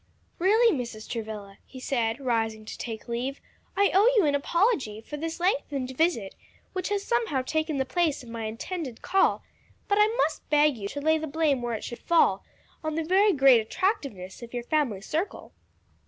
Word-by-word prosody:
"Really, 435 +4 +4
Mrs. 235 -4 -6
Travilla," 215 -4 -6
he 260 - -12
said, 235 -2 -1
rising 225 -4 -1
to - - -7
take 225 -1 -6
leave, 250 +4 -3 0.4
"I 400 0 +4
owe 410 +6 +6
you 400 - +5
an 290 - +2
apology 285 - +1
for 260 +7 -8
this 325 +3 -4
lengthened 280 -7 -1
visit, 285 - +1 0.4
which 370 0 -2
has 405 -1 -1
somehow 450 - 0
taken 315 +2 -1
the 265 - 0
place 325 -5 0
of 240 - -12
my 230 -1 -5
intended 250 +4 -5
call; 385 - +2 0.4
but 405 0 +2
I 420 - +6
must - - -1
beg 295 -1 +4
you 200 -3 -5
to 285 +8 -5
lay 315 +2 +3
the 315 - -4
blame 295 -3 +1
where 240 -1 -2
it - - -6
should 240 - -6
fall, 340 -1 +3 0.4
on 310 -1 -2
the 325 - 0
very 385 +5 +4
great 270 - +6
attractiveness 220 - -2
of 235 +1 -9
your 240 - -3
family 245 -8 0
circle." 320 - -4
280 Hz, 185 wpm, -27 LUFS, 235-340 Hz, 0.4 s, owe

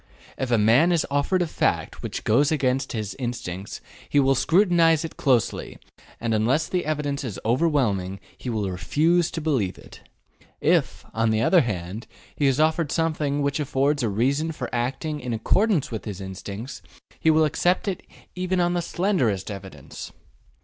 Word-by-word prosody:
If 130 - -3
a 120 - +3
man 120 +11 +4
is 170 -3 +2
offered 145 +6 +1
a - - -3
fact - - -1
which - - -5
goes 140 +7 +3
against 135 -3 0
his 110 -3 -4
instincts, 105 -7 -5 0.3
he 145 - +3
will 135 0 +4
scrutinize 165 +1 +3
it 165 - -8
closely, 130 -5 0 0.4
and 115 -1 -1
unless 120 +9 +2
the 180 -4 -2
evidence 145 -2 -2
is 115 -7 -5
overwhelming, 115 - +1 0.2
he 125 - -6
will 110 -4 -1
refuse 160 - +2
to 165 - -5
believe 130 - 0
it. - - -14 0.6
If, - - +1
on 115 0 +1
the 110 0 +1
other 180 +6 +5
hand, 100 -1 -4 0.3
he 145 - +2
is 135 +1 +2
offered 155 0 +2
something 150 -3 0
which 140 +1 0
affords 140 0 +1
a 115 - 0
reason 140 +10 0
for 155 - -6
acting 135 +6 -2
in 125 -2 -4
accordance 180 - +1
with 110 - -5
his 100 -4 -5
instincts, 100 +5 -7 0.4
he 160 - +3
will 160 0 +5
accept 175 +6 +1
it 190 -3 -2 0.3
even 185 0 -1
on 175 0 +2
the 175 - 0
slenderest 130 - 0
evidence. 95 -8 -9
140 Hz, 170 wpm, -24 LUFS, 110-160 Hz, 0.6 s, other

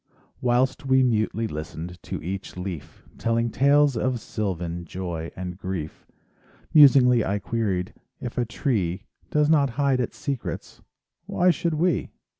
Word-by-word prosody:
Whilst 125 +2 +1
we 130 0 +5
mutely 115 -2 +1
listened 85 +1 -7
To - - -5
each 95 +2 -5
leaf 90 -5 -7 0.2
Telling 115 0 +1
tales 140 +1 +4
of 125 +2 0
sylvan 85 -6 -3
Joy 85 -1 -5
and 90 0 -6
grief, 90 -6 -5 0.7
Musingly 130 -5 +7
I 100 +1 0
queried: 100 -2 -2 0.3
If 125 - -6
a - - +3
tree 105 - -1 0.3
Does 150 0 +3
not 145 -3 +4
hide 140 -3 +2
its 125 - -3
secrets— 140 -4 -5 0.5
Why 180 +1 +3
should 170 0 -1
we? 175 +3 +1
115 Hz, 135 wpm, -25 LUFS, 90-135 Hz, 0.7 s, Musingly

